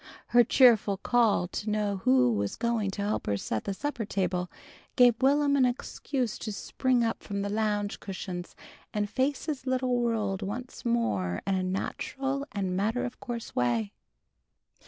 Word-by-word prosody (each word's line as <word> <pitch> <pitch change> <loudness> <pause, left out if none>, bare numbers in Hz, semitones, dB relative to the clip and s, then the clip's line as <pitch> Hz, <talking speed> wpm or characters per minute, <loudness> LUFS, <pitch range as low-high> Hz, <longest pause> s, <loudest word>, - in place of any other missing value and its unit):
Her 240 0 +6
cheerful 230 -5 +5
call 220 -4 +2
to 210 +3 -4
know 210 -1 0
who 125 -8 +4
was 100 -1 -1
going 230 -3 0
to 200 +1 -4
help 210 +1 -2
her 100 - +1
set 110 +2 -3
the 200 - -1
supper 290 -1 -3
table, 185 -3 -1 0.5
gave 245 -2 +5
Will'm 280 +1 +4
an 275 - +4
excuse 250 -1 -2
to 215 - -4
spring 250 +4 0
up 225 0 -1
from 200 -1 -3
the 200 - -2
lounge 210 -1 -1
cushions 185 -2 -6 0.4
and 210 0 +1
face 260 +6 -1
his 275 -4 -4
little 255 -1 +1
world 215 -5 0
once 240 +6 -6
more 100 - 0
in 195 - +1
a 190 - +1
natural 270 +9 -3
and 190 -3 -2
matter 220 +6 0
of 245 - -7
course 235 -2 -6
way. 120 -4 +1
215 Hz, 165 wpm, -28 LUFS, 190-245 Hz, 0.5 s, Her